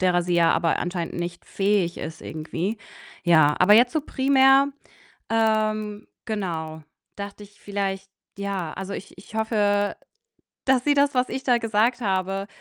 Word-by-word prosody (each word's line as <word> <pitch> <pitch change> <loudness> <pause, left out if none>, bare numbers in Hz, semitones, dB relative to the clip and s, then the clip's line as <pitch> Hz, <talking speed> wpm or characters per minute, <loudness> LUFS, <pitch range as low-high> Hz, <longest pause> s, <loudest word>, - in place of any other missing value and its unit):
derer 180 -1 +3
sie 175 0 -1
ja 170 -1 +4
aber 165 -1 +1
anscheinend 175 -1 -3
nicht 175 0 -5
fähig 195 -3 0
ist 160 0 -7
irgendwie. 165 +7 -4 0.5
Ja, 155 -4 +5
aber 205 +3 +6
jetzt 240 +4 +5
so 315 - +1
primär, 270 0 +4 0.6
ähm, 215 -1 0 0.2
genau, 165 -8 -4 0.3
dachte 200 0 -7
ich 205 0 -18
vielleicht 195 -1 -3 0.3
ja, 195 -5 -3
also, 195 +1 -6
ich 185 - -9
ich 200 - -15
hoffe, 205 -2 +1 0.7
dass 260 -2 +3
sie 290 - +3
das, 280 0 +3
was 250 0 +1
ich 265 - -4
da 245 -2 +3
gesagt 230 +2 +1
habe, 195 0 -1
200 Hz, 150 wpm, -24 LUFS, 180-225 Hz, 0.7 s, aber